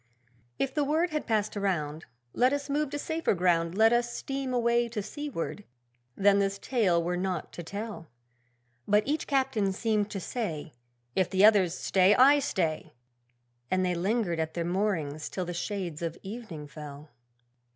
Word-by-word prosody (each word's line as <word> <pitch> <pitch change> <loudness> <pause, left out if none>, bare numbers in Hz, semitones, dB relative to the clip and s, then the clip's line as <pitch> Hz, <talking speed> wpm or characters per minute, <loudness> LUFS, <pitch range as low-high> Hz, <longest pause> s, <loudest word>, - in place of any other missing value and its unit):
If 265 - -1
the 295 0 +1
word 315 +4 +1
had 305 -1 -3
passed 215 -2 0
around, 165 -6 -2 0.3
'Let 255 +3 +3
us 285 0 -3
move 295 0 0
to 290 - -3
safer 320 -5 0
ground; 170 0 +1
Let 225 +1 +6
us 240 0 +1
steam 270 +1 -4
away 235 -1 +2
to 220 -3 -3
seaward' 250 - -5 0.5
then 200 0 +4
this 200 0 0
tale 195 -8 +1
were 175 +1 -1
not 180 -2 -2
to - - -6
tell! 200 0 -6 0.8
But 210 +1 +4
each 300 +2 -1
Captain 260 -8 +1
seemed 210 +1 0
to 200 - -4
say 165 - -4 0.4
'If 185 -2 +2
the 190 +1 +5
others 195 -5 +4
stay, 190 +2 +4
I 280 +3 +7
stay!' 175 - -2 0.8
And 185 0 +1
they 180 - +1
lingered 180 -1 0
at 160 0 -2
their 170 -1 -1
moorings 170 -6 -1
till 185 - -3
the 175 - -4
shades 175 -3 -4
of 165 0 -3
evening 195 -8 -7
fell. 150 0 -10
200 Hz, 165 wpm, -29 LUFS, 170-240 Hz, 0.8 s, I